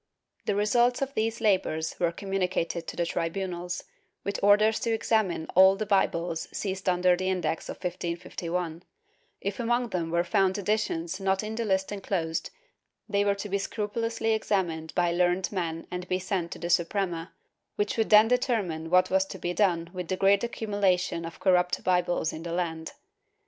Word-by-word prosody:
The 205 Hz, -, +1 dB
results 240 Hz, +5 st, +3 dB
of 275 Hz, 0 st, -5 dB
these 225 Hz, -1 st, -1 dB
labors 185 Hz, -7 st, +1 dB
were 170 Hz, -1 st, +2 dB
communicated 180 Hz, -2 st, -2 dB
to -, -, -5 dB
the 170 Hz, -, 0 dB
tribunals, 175 Hz, +1 st, -3 dB, 0.4 s
with 200 Hz, 0 st, -2 dB
orders 215 Hz, +2 st, +5 dB
to 230 Hz, -, -1 dB
examine 220 Hz, -7 st, +1 dB
all 190 Hz, +1 st, +7 dB
the 215 Hz, -, -3 dB
Bibles 170 Hz, -4 st, 0 dB
seized 190 Hz, -1 st, -2 dB
under 180 Hz, 0 st, +4 dB
the 185 Hz, +1 st, -2 dB
Index 180 Hz, -3 st, -2 dB
of -, -, -4 dB
1551; 175 Hz, -1 st, -4 dB, 0.6 s
if 200 Hz, -1 st, -3 dB
among 240 Hz, +1 st, +1 dB
them 170 Hz, -4 st, -2 dB
were 170 Hz, +1 st, +2 dB
found 190 Hz, +1 st, +2 dB
editions 190 Hz, -4 st, -1 dB
not 195 Hz, +1 st, +1 dB
in 215 Hz, +1 st, -4 dB
the 230 Hz, +1 st, -2 dB
list 190 Hz, -1 st, 0 dB
enclosed, 185 Hz, -5 st, -2 dB, 0.6 s
they 200 Hz, -1 st, +1 dB
were 200 Hz, 0 st, +2 dB
to 200 Hz, +1 st, -5 dB
be 200 Hz, 0 st, -1 dB
scrupulously 225 Hz, +2 st, -2 dB
examined 175 Hz, -7 st, -1 dB
by 175 Hz, -1 st, +2 dB
learned 180 Hz, +1 st, +1 dB
men 165 Hz, -4 st, -3 dB
and 180 Hz, 0 st, -5 dB
be 185 Hz, -, +1 dB
sent 185 Hz, -2 st, -2 dB
to -, -, -9 dB
the 170 Hz, 0 st, -3 dB
Suprema, 175 Hz, -1 st, 0 dB, 0.4 s
which 205 Hz, 0 st, -1 dB
would 225 Hz, -1 st, 0 dB
then 215 Hz, +1 st, +8 dB
determine 215 Hz, -10 st, 0 dB
what 180 Hz, +1 st, +4 dB
was 190 Hz, 0 st, +3 dB
to -, -, -7 dB
be 175 Hz, -, -3 dB
done 175 Hz, -4 st, +1 dB
with 180 Hz, -2 st, -5 dB
the 185 Hz, -, -1 dB
great 195 Hz, +2 st, +4 dB
accumulation 195 Hz, -7 st, 0 dB
of 165 Hz, -, -8 dB
corrupt 180 Hz, -1 st, +2 dB
Bibles 175 Hz, -3 st, +1 dB
in 160 Hz, -, -6 dB
the 170 Hz, 0 st, -5 dB
land. 165 Hz, -2 st, -3 dB
185 Hz, 175 wpm, -28 LUFS, 170-205 Hz, 0.6 s, then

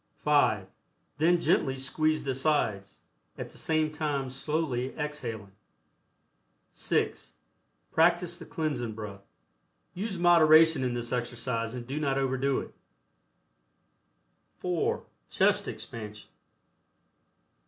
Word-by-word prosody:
(5) 145 Hz, -10 st, +3 dB, 0.5 s
Then 170 Hz, +3 st, +4 dB
gently 135 Hz, -5 st, +2 dB
squeeze 155 Hz, +3 st, 0 dB
the 135 Hz, -2 st, -1 dB
sides, 125 Hz, -8 st, 0 dB, 0.4 s
at -, -, -6 dB
the -, -, -11 dB
same 155 Hz, -1 st, +1 dB
time 145 Hz, -4 st, -2 dB
slowly 135 Hz, -2 st, -2 dB
exhaling. 120 Hz, -10 st, -5 dB, 1.2 s
(6) -, -, -1 dB, 0.6 s
Practice 175 Hz, +1 st, +2 dB
the 165 Hz, -, -10 dB
cleansing 135 Hz, -8 st, -2 dB
breath. 100 Hz, -3 st, -7 dB, 0.7 s
Use 195 Hz, +1 st, -4 dB
moderation 165 Hz, -3 st, +6 dB
in 125 Hz, -1 st, -1 dB
this 120 Hz, -1 st, -4 dB
exercise 120 Hz, -1 st, -2 dB
and 120 Hz, -1 st, -6 dB
do 135 Hz, +5 st, -3 dB
not 140 Hz, -3 st, 0 dB
overdo 135 Hz, 0 st, 0 dB
its -, -, -12 dB, 1.8 s
(4) 180 Hz, -2 st, -1 dB, 0.3 s
CHEST -, -, +2 dB
EXPANSION. 105 Hz, -2 st, -8 dB
140 Hz, 100 wpm, -29 LUFS, 120-155 Hz, 1.8 s, moderation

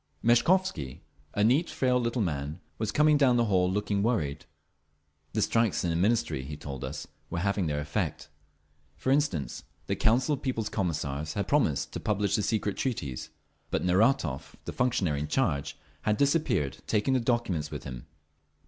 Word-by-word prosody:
Meshkovsky, 120 Hz, -, +2 dB, 0.3 s
a 105 Hz, -, +2 dB
neat, 135 Hz, +10 st, +3 dB
frail 130 Hz, -5 st, +1 dB
little 115 Hz, -1 st, 0 dB
man, 75 Hz, -1 st, -3 dB, 0.2 s
was 110 Hz, -1 st, -1 dB
coming 150 Hz, +2 st, +4 dB
down 130 Hz, -4 st, +5 dB
the 120 Hz, -, +3 dB
hall, 90 Hz, -3 st, +2 dB
looking 100 Hz, 0 st, 0 dB
worried. 95 Hz, -11 st, 0 dB, 0.9 s
The -, -, +2 dB
strikes 115 Hz, -3 st, +2 dB
in 85 Hz, -, +1 dB
the -, -, 0 dB
Ministries, 90 Hz, -, +1 dB
he 75 Hz, 0 st, -6 dB
told 70 Hz, -3 st, -7 dB
us, 65 Hz, +3 st, -5 dB, 0.2 s
were -, -, -3 dB
having 100 Hz, 0 st, 0 dB
their 75 Hz, -1 st, -1 dB
effect. 75 Hz, 0 st, -2 dB, 0.7 s
For 130 Hz, -, 0 dB
instance, 135 Hz, -, 0 dB, 0.2 s
the -, -, -1 dB
Council 125 Hz, +6 st, +3 dB
of 140 Hz, -, -3 dB
People's 115 Hz, -5 st, -1 dB
Commissars 75 Hz, -6 st, -2 dB
had 100 Hz, -, -1 dB
promised 140 Hz, -, +1 dB
to -, -, -3 dB
publish 105 Hz, -2 st, 0 dB
the -, -, +1 dB
Secret 105 Hz, -1 st, -1 dB
Treaties; 70 Hz, -, -3 dB, 0.4 s
but -, -, -1 dB
Neratov, 90 Hz, -, +2 dB
the -, -, -5 dB
functionary 95 Hz, -, +1 dB
in 75 Hz, -, -3 dB
charge, 75 Hz, -, 0 dB, 0.2 s
had 105 Hz, -1 st, +1 dB
disappeared, 140 Hz, -, +1 dB
taking 110 Hz, +5 st, +2 dB
the 130 Hz, -, +3 dB
documents 115 Hz, -, 0 dB
with -, -, -6 dB
him. 65 Hz, -2 st, -8 dB
105 Hz, 165 wpm, -29 LUFS, 75-125 Hz, 0.9 s, down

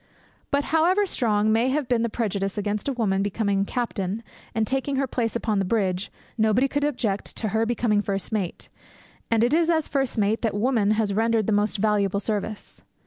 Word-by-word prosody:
But, 280 Hz, 0 st, +1 dB
however 360 Hz, +6 st, +4 dB
strong 215 Hz, -, +1 dB
may 230 Hz, +3 st, +2 dB
have 280 Hz, 0 st, 0 dB
been 240 Hz, -2 st, +2 dB
the 235 Hz, -, 0 dB
prejudice 200 Hz, -3 st, -2 dB
against 205 Hz, +2 st, -2 dB
a 280 Hz, -, 0 dB
woman 200 Hz, -6 st, 0 dB
becoming 200 Hz, -1 st, 0 dB
captain, 220 Hz, -3 st, -3 dB, 0.3 s
and 220 Hz, -1 st, +2 dB
taking 270 Hz, +3 st, -1 dB
her 270 Hz, +1 st, +1 dB
place 235 Hz, -3 st, -2 dB
upon 220 Hz, -3 st, 0 dB
the -, -, +1 dB
bridge, 190 Hz, -2 st, -1 dB, 0.3 s
nobody 220 Hz, +5 st, +3 dB
could 285 Hz, +1 st, -1 dB
object 230 Hz, -9 st, -1 dB
to 220 Hz, -, -2 dB
her 225 Hz, +2 st, +1 dB
becoming 225 Hz, -3 st, +1 dB
first 195 Hz, 0 st, -3 dB
mate; 200 Hz, -6 st, -2 dB, 0.6 s
and 230 Hz, -1 st, +3 dB
it 245 Hz, +4 st, +2 dB
is 335 Hz, +1 st, +3 dB
as 320 Hz, -2 st, +2 dB
first 270 Hz, -3 st, -1 dB
mate 215 Hz, +1 st, +1 dB
that 220 Hz, -4 st, -1 dB
woman 220 Hz, -1 st, +2 dB
has 210 Hz, -3 st, +1 dB
rendered 225 Hz, 0 st, +2 dB
the 220 Hz, -, +1 dB
most 205 Hz, +1 st, +1 dB
valuable 200 Hz, -1 st, +1 dB
service. 210 Hz, 0 st, -4 dB
220 Hz, 195 wpm, -25 LUFS, 205-245 Hz, 0.6 s, however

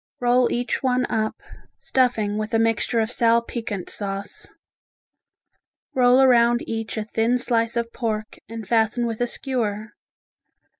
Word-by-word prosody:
Roll 245 Hz, 0 st, +3 dB
each 245 Hz, +1 st, -1 dB
one 255 Hz, -1 st, +1 dB
up, 220 Hz, 0 st, 0 dB, 0.4 s
stuffing 220 Hz, -5 st, 0 dB
with 215 Hz, +2 st, -2 dB
a -, -, +5 dB
mixture 225 Hz, +1 st, +1 dB
of 220 Hz, +1 st, -2 dB
sal 230 Hz, -1 st, +3 dB
piquant 225 Hz, -6 st, -5 dB
sauce. 200 Hz, -1 st, -5 dB, 1.5 s
Roll 250 Hz, +1 st, +5 dB
around 240 Hz, -2 st, +4 dB
each 225 Hz, 0 st, -4 dB
a 215 Hz, -, -1 dB
thin 225 Hz, +3 st, 0 dB
slice 235 Hz, -1 st, 0 dB
of 235 Hz, 0 st, -2 dB
pork 215 Hz, -2 st, -4 dB
and 225 Hz, -3 st, -7 dB
fasten 225 Hz, +2 st, +1 dB
with 230 Hz, 0 st, -4 dB
a 245 Hz, -, +2 dB
skewer. 220 Hz, -5 st, -3 dB
230 Hz, 140 wpm, -23 LUFS, 220-245 Hz, 1.5 s, a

